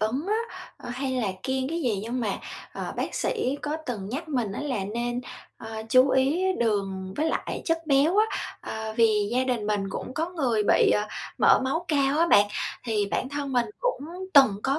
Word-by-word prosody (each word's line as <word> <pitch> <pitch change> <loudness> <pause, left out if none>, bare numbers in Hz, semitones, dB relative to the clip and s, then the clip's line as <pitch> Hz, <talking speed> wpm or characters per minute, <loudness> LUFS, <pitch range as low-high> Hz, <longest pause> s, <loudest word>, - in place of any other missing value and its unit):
ứng 250 - -1
á, 425 - +1 0.4
ờ, - - -10
hay 260 +2 -2
là 240 -6 0
kiêng 265 0 -1
cái 335 +1 -2
gì 220 -6 +1
nhưng 240 +3 -3
mà, 210 -4 -1 0.3
ờ, - - -5
bác - - -2
sĩ 290 - 0
có 300 +1 -2
từng 205 -6 -4
nhắc 305 +7 -4
mình 240 -8 -1
á - - -4
là 250 -10 -2
nên, 240 +4 -2 0.4
à, 220 0 -6
chú 255 +3 +6
ý 275 +8 +2
đường 195 -4 -1
với 315 +2 +1
lại - - -3
chất 330 -1 +1
béo 285 +5 +4
á, 435 - +5 0.3
ờ, 220 0 -5
vì 215 -3 +3
gia 255 +1 +2
đình 245 -5 -1
mình 205 -2 0
cũng 255 - -5
có 325 +2 -1
người 255 -11 +1
bị, - - +4
ờ, 210 0 +2 0.3
mỡ - - +6
máu 325 +7 -1
cao 280 -1 +2
á 335 - +4
bạn. 205 -8 +6 0.4
Thì 210 -3 0
bản 260 - -1
thân 285 -1 -4
mình 245 -1 +2
cũng - - 0 0.4
từng 265 -8 +7
có 275 +2 +1
255 Hz, 205 wpm, -26 LUFS, 215-285 Hz, 0.4 s, từng